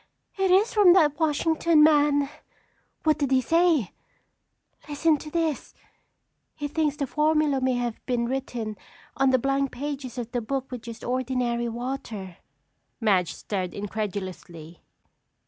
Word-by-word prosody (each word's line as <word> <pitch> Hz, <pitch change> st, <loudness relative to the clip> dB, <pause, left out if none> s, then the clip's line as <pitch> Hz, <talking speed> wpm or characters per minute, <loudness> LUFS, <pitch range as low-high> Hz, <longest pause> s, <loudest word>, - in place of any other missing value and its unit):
"Oh, -, -, +1 dB
it 380 Hz, -, +3 dB
is 400 Hz, +6 st, +4 dB
from 400 Hz, -5 st, +7 dB
that 300 Hz, -5 st, +3 dB
Washington 320 Hz, 0 st, +3 dB
man!" 290 Hz, -2 st, +4 dB, 0.8 s
"What 310 Hz, -1 st, +2 dB
does 285 Hz, -3 st, 0 dB
he 265 Hz, -1 st, +4 dB
say?" 325 Hz, -, +2 dB, 1.0 s
"Listen 300 Hz, +1 st, +2 dB
to 305 Hz, -, -9 dB
this! 320 Hz, -2 st, -2 dB, 0.8 s
He 290 Hz, -2 st, -4 dB
thinks 300 Hz, -1 st, 0 dB
the 290 Hz, -2 st, -2 dB
formula 300 Hz, 0 st, +1 dB
may 255 Hz, -1 st, +1 dB
have 240 Hz, -2 st, -3 dB
been 245 Hz, -2 st, 0 dB
written 235 Hz, -4 st, -4 dB, 0.4 s
on 270 Hz, 0 st, +3 dB
the 260 Hz, -, +4 dB
blank 275 Hz, +1 st, 0 dB
pages 270 Hz, -2 st, -5 dB
of 240 Hz, -1 st, -5 dB
the 245 Hz, -, -1 dB
book 265 Hz, +3 st, -4 dB
with 250 Hz, -2 st, -5 dB
just 230 Hz, -1 st, -9 dB
ordinary 245 Hz, -2 st, -1 dB
water." 230 Hz, -6 st, -6 dB, 0.6 s
Madge 195 Hz, -7 st, +1 dB
stared 185 Hz, -4 st, -4 dB
incredulously. 190 Hz, -5 st, -6 dB
265 Hz, 140 wpm, -25 LUFS, 235-300 Hz, 1.0 s, from